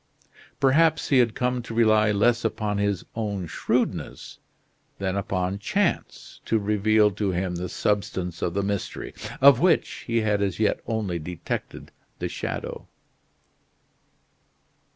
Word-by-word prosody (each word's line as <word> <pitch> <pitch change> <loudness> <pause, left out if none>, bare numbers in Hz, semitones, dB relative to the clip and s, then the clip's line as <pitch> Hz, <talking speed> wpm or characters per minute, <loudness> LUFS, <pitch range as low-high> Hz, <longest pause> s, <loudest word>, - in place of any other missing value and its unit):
Perhaps 155 +4 +3
he 135 - +5
had 120 -3 +2
come 125 0 0
to 115 -1 -8
rely 110 -2 +4
less 115 +4 +2
upon 105 -2 -1
his 100 -2 -1
own 105 -5 -2
shrewdness 80 - -2 0.6
than 95 -1 -2
upon 95 -1 -2
chance - - -2
to 115 - +2
reveal 105 0 +3
to 100 +1 -2
him 90 0 -1
the 90 +1 -4
substance 95 -4 -2
of 85 - -1
the 100 - +1
mystery, 100 -1 -3 0.3
of 135 -2 +8
which 180 +4 +1
he 115 -1 +1
had 105 -2 +1
as 100 -2 -1
yet 110 - +2
only 105 -7 -2
detected 85 +2 -6 0.3
the - - -3
shadow. - - -5
105 Hz, 130 wpm, -25 LUFS, 95-115 Hz, 0.6 s, of